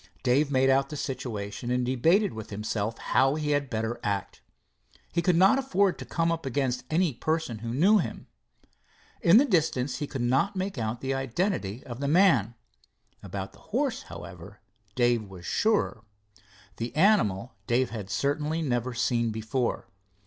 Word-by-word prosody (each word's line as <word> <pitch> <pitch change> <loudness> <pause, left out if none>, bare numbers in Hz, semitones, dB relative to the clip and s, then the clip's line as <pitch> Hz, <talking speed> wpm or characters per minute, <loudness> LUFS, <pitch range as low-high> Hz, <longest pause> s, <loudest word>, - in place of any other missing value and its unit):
Dave 135 +3 +3
made 135 -1 +3
out 135 +1 +2
the 150 - -6
situation, 120 -5 -4
and 125 0 +1
debated 160 - +2
with 110 -1 -8
himself 105 +1 -3
how 135 +2 +2
he 150 -1 -1
had 145 -2 0
better 110 +1 -2
act. 100 -2 -3 0.7
He 170 - +2
could 175 0 +2
not 190 +10 +5
afford 200 -8 +1
to - - -6
come 165 0 0
up 165 -1 -2
against 130 -2 -1
any 165 -1 +2
person 155 -4 -2
who 115 +1 -5
knew 190 - +4
him. - - -4 1.0
In 170 +5 +7
the 270 - +6
distance 150 - 0
he 145 - -3
could 135 -4 -4
not 135 +12 +1
make 190 -6 -3
out 110 +1 -3
the 135 0 -1
identity 135 - -2
of 120 -1 -7
the 140 - -2
man. 145 - +4 0.7
About - - -6
the - - -18
horse, - - -2
however, 95 +2 -10 0.4
Dave 120 -4 +1
was 90 -2 -11
surer. 210 - +1 0.7
The 115 +3 -5
animal 130 - +3
Dave 125 0 +1
had 105 -4 -6
certainly 150 +5 -1
never 125 -3 -1
seen 120 -1 +1
before. 110 +3 -2
130 Hz, 165 wpm, -27 LUFS, 115-160 Hz, 1.0 s, In